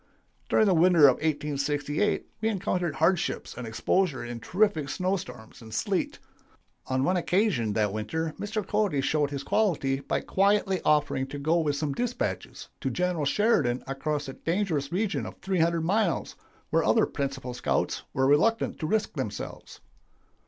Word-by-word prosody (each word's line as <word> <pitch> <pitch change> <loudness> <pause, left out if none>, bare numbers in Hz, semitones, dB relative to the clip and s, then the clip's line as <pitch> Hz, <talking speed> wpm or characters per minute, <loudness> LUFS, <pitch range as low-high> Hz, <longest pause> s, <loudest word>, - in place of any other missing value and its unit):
"During 220 - +4
the 195 - +4
winter 170 -1 +5
of 130 - +4
1868 145 +3 -1 0.2
we 220 - +2
encountered 180 -5 -1
hardships 170 +2 0
and 125 -2 -6
exposure 135 +5 0
in 120 -1 -6
terrific 180 - +1
snow 185 +6 0
storms 125 - -9
and 110 -1 -11
sleet. 110 - -1 0.7
On 130 0 0
one 180 +5 +2
occasion 175 - +1
that 105 -2 +1
winter 155 +10 -2
Mr. 205 0 -3
Cody 205 -9 +1
showed 145 +1 +1
his 140 -1 -5
quality 145 -10 +1
by - - -2
quietly 195 -1 +2
offering 145 -3 +2
to 145 - -6
go 155 +4 +1
with 150 -3 0
some 145 -1 -2
dispatches 245 - -3
to - - -2
General 180 -4 -1
Sheridan 140 - +2
across 145 +2 -3
a 135 - -6
dangerous 165 -5 -1
region 195 +2 -1
of - - -9
300 170 -3 +1
miles 190 +1 0 0.4
where - - +3
other - - +4
principal 135 -3 -4
scouts - - -1
were 130 - +1
reluctant 155 +12 +2
to 155 - -2
risk 215 +4 0
themselves. - - -6
155 Hz, 155 wpm, -27 LUFS, 140-190 Hz, 0.7 s, winter